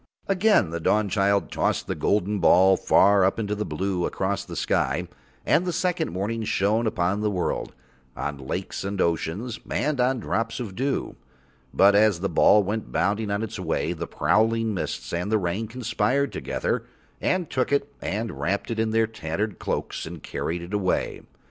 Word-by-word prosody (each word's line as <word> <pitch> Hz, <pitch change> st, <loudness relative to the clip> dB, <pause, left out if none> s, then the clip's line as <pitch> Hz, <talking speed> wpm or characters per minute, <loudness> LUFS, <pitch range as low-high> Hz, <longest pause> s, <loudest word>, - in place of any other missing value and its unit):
Again 195 Hz, -, +3 dB
the 85 Hz, -, -3 dB
Dawnchild 100 Hz, +1 st, +1 dB
tossed -, -, 0 dB
the -, -, -2 dB
golden 105 Hz, 0 st, 0 dB
ball 95 Hz, +2 st, +6 dB
far 100 Hz, +1 st, +4 dB
up 95 Hz, -, +2 dB
into 105 Hz, -2 st, -2 dB
the 105 Hz, 0 st, -3 dB
blue 90 Hz, +3 st, -1 dB
across -, -, -2 dB
the -, -, -8 dB
sky, 80 Hz, +7 st, 0 dB, 0.4 s
and 175 Hz, -, +3 dB
the 180 Hz, -, -1 dB
second 180 Hz, -, -1 dB
morning 105 Hz, +6 st, -2 dB
shone 110 Hz, +3 st, +1 dB
upon 100 Hz, 0 st, 0 dB
the 105 Hz, -, +1 dB
world, 90 Hz, -4 st, -2 dB, 0.4 s
on 70 Hz, +2 st, -3 dB
lakes 65 Hz, +7 st, -4 dB
and 100 Hz, 0 st, -3 dB
oceans, 95 Hz, +8 st, -1 dB
and 140 Hz, 0 st, 0 dB
on 125 Hz, +1 st, +2 dB
drops 115 Hz, +2 st, -2 dB
of 105 Hz, -6 st, -5 dB
dew. 135 Hz, +4 st, -2 dB, 0.5 s
But 100 Hz, +1 st, +5 dB
as 105 Hz, -3 st, +4 dB
the 100 Hz, -, 0 dB
ball 105 Hz, 0 st, +5 dB
went 105 Hz, +3 st, -3 dB
bounding 105 Hz, +2 st, 0 dB
on 100 Hz, +2 st, -1 dB
its 110 Hz, -, -5 dB
way, 85 Hz, -, -1 dB
the 85 Hz, -1 st, -5 dB
prowling 115 Hz, 0 st, +2 dB
mists 95 Hz, -, -4 dB
and 90 Hz, +5 st, -2 dB
the 110 Hz, -, +4 dB
rain 100 Hz, +3 st, -2 dB
conspired 125 Hz, +3 st, 0 dB
together -, -, -2 dB, 0.4 s
and 180 Hz, -2 st, 0 dB
took 130 Hz, -1 st, -1 dB
it 140 Hz, 0 st, 0 dB
and 110 Hz, +3 st, -3 dB
wrapped 100 Hz, +6 st, -1 dB
it 115 Hz, -, -2 dB
in 110 Hz, 0 st, +1 dB
their 115 Hz, 0 st, +3 dB
tattered 105 Hz, -1 st, -4 dB
cloaks -, -, -3 dB
and 80 Hz, -2 st, -9 dB
carried 85 Hz, +1 st, -3 dB
it 90 Hz, +4 st, -9 dB
away. 100 Hz, -3 st, 0 dB
105 Hz, 175 wpm, -25 LUFS, 95-115 Hz, 0.5 s, ball